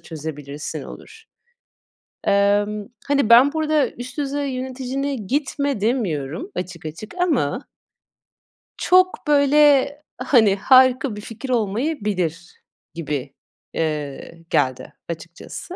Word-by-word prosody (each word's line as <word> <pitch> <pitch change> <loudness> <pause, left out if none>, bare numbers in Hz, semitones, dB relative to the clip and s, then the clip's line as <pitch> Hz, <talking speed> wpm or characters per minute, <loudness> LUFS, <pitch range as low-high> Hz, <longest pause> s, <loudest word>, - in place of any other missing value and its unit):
çözebilirsin 150 -2 -6
olur. 445 - -12 1.0
Emm, 205 +1 +2 0.2
hani, 280 -5 +2
ben 255 +5 +7
burada 310 -2 +1
üst 245 +3 -9
düzey 285 0 -2
yöneticine 260 +2 -3
gitme 275 +1 -2
demiyorum 210 - -1
açık 180 -2 -6
açık 165 +8 -8
ama 295 - 0 1.1
çok, 370 +2 +3
böyle, 290 -1 +5 0.3
hani, 235 -6 +4
harika 255 +2 +4
bir 210 - -7
fikir 230 +5 -8
olmayabilir 205 - -2 0.3
gibi, 145 -4 -4 0.4
eee, 155 +1 -4
geldi 130 -1 0 0.2
açıkçası. 170 - -8
235 Hz, 95 wpm, -21 LUFS, 170-280 Hz, 1.1 s, ben